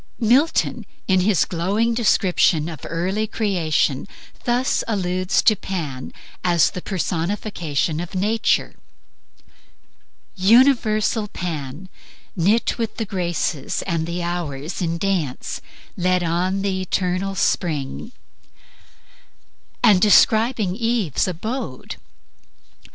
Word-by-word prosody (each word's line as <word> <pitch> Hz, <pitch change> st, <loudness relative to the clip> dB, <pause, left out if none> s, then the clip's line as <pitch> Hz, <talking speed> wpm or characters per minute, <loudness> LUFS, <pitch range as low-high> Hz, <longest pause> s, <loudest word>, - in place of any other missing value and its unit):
Milton 255 Hz, +8 st, +2 dB, 0.2 s
in 185 Hz, -1 st, +3 dB
his 185 Hz, -3 st, +3 dB
glowing 200 Hz, +7 st, 0 dB
description 185 Hz, -8 st, +2 dB
of 160 Hz, -5 st, -8 dB
the -, -, -8 dB
early 190 Hz, +6 st, -1 dB
creation, 170 Hz, -, 0 dB, 0.4 s
thus 245 Hz, +2 st, +1 dB
alludes 185 Hz, -3 st, 0 dB
to 215 Hz, -, +5 dB
Pan 155 Hz, -10 st, -5 dB, 0.3 s
as 175 Hz, -3 st, +3 dB
the 180 Hz, -, -6 dB
personification 170 Hz, -4 st, -2 dB
of 175 Hz, +2 st, -6 dB
Nature: 215 Hz, +4 st, +1 dB, 0.9 s
"... -, -, -39 dB, 0.2 s
Universal 225 Hz, -4 st, +3 dB
Pan, 160 Hz, -3 st, -5 dB, 0.5 s
Knit 205 Hz, +8 st, +1 dB
with 225 Hz, -1 st, -3 dB
the 225 Hz, -, -2 dB
Graces 175 Hz, -7 st, -2 dB
and 165 Hz, -3 st, -2 dB
the 175 Hz, +1 st, -3 dB
Hours 170 Hz, -2 st, -4 dB
in 170 Hz, -1 st, -1 dB
dance, 175 Hz, -8 st, -2 dB, 0.3 s
Led 180 Hz, 0 st, +1 dB
on 180 Hz, +4 st, 0 dB
the 190 Hz, -2 st, -1 dB
eternal 185 Hz, +1 st, -1 dB
spring." 160 Hz, -, -1 dB, 1.7 s
And 195 Hz, -4 st, +6 dB
describing 215 Hz, 0 st, +4 dB
Eve's 225 Hz, -, 0 dB
abode 185 Hz, -, -5 dB
185 Hz, 100 wpm, -21 LUFS, 170-215 Hz, 1.7 s, And